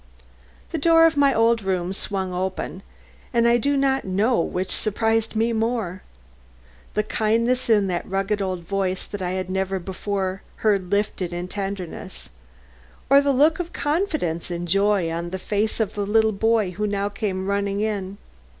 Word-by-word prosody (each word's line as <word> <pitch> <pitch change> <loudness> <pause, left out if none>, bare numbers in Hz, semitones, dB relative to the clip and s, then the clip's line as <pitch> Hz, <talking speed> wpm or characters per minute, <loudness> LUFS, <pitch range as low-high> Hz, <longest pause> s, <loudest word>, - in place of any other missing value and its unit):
The 330 - -2
door 330 +2 +6
of 325 - +3
my 285 -1 +4
old 230 -1 +3
room 185 -2 -1
swung 190 -2 -3
open 185 +1 -3 0.5
and 235 -1 +3
I 235 0 +5
do 280 +4 +1
not 270 0 +2
know 205 +6 +1
which 185 +2 -2
surprised 225 +1 0
me 225 +2 +1
most, 220 -5 -1 1.0
the 210 - +2
kindness 230 +4 +1
in 210 -3 +4
the 180 -2 -1
rugged 195 +2 -1
old 185 -2 -2
voice 190 0 -2
I 185 -3 -2
had 185 -1 -2
never 190 +1 -1
before 190 +1 -3 0.2
heard 195 -4 +2
lifted 200 -3 -1
in 175 +1 -4
tenderness, 185 - -6 0.8
or 280 0 +8
the 285 0 +2
look 300 +5 +4
of 350 -1 -4
confidence 295 - -1
and 175 0 -4
joy 195 -2 +2
on 170 +1 -3
the 190 - -4
face 210 +4 -1
of 215 -2 0
the 205 -1 -2
little 220 +1 +4
boy 220 -1 +1
who 210 +4 -2
now 200 0 -1
came 200 -2 -3
running 200 0 -1
in. 200 -2 -2
200 Hz, 165 wpm, -23 LUFS, 185-225 Hz, 1.0 s, or